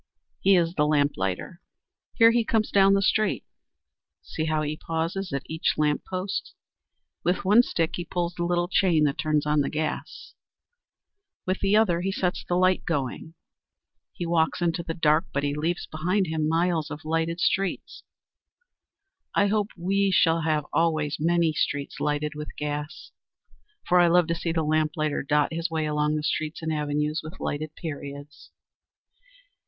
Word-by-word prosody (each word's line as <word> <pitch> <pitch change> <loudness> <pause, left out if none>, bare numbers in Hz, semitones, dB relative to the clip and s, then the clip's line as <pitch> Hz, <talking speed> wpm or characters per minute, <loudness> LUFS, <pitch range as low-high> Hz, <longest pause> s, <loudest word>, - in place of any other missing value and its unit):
He 195 0 +4
is 170 -1 +2
the 150 -3 +1
lamplighter. 145 - -1 0.5
Here 230 -1 +7
he 235 0 +2
comes 220 -1 0
down 195 0 +5
the 195 - +2
street! 215 +2 +1 0.8
See 155 - -4
how 155 -1 0
he 150 +1 -2
pauses 165 +5 -3
at 140 0 -2
each 160 +1 -1
lamp 150 -1 +1
post. 190 +2 -4 0.7
With 180 +2 0
one 210 +5 +7
stick 165 -9 -1
he 175 - -3
pulls 175 0 -2
the 170 0 -3
little 175 0 +1
chain 175 -4 +3
that 140 -2 0
turns 155 -1 +1
on 150 0 +2
the 140 - -1
gas; 155 0 -4 1.1
with 185 +1 -1
the 200 +1 +2
other 180 -6 +3
he 195 +2 -1
sets 185 -2 -1
the 175 - -1
light 185 0 +3
going. 155 +1 -3 0.8
He 175 - -5
walks 165 -1 +1
into 170 -1 0
the 165 -1 -5
dark, 155 -1 +2
but 140 - -1
he 145 0 0
leaves 165 +4 -2
behind 180 +6 0
him 160 -2 -1
miles 165 -1 +1
of 155 +1 -8
lighted 165 +2 -1
streets. 195 +1 -1 1.3
I 200 0 +3
hope 210 -1 +1
we 195 +3 +1
shall 165 -3 +3
have 155 -2 0
always 155 -3 +1
many 165 0 +2
streets 145 -2 -2
lighted 150 0 -1
with 150 0 -8
gas, 150 0 -5 0.8
for 180 - +4
I 175 - +6
love 175 0 +4
to - - +2
see 165 0 -2
the 165 -1 0
lamplighter 155 -1 0
dot 150 +2 +1
his 165 +1 -2
way 160 -1 -1
along 150 0 0
the 150 - -2
streets 155 +1 -2
and 160 0 -1
avenues 150 0 -1
with 155 +4 -10
lighted 155 +1 -4
periods. 145 -2 -8
160 Hz, 165 wpm, -26 LUFS, 150-180 Hz, 1.3 s, Here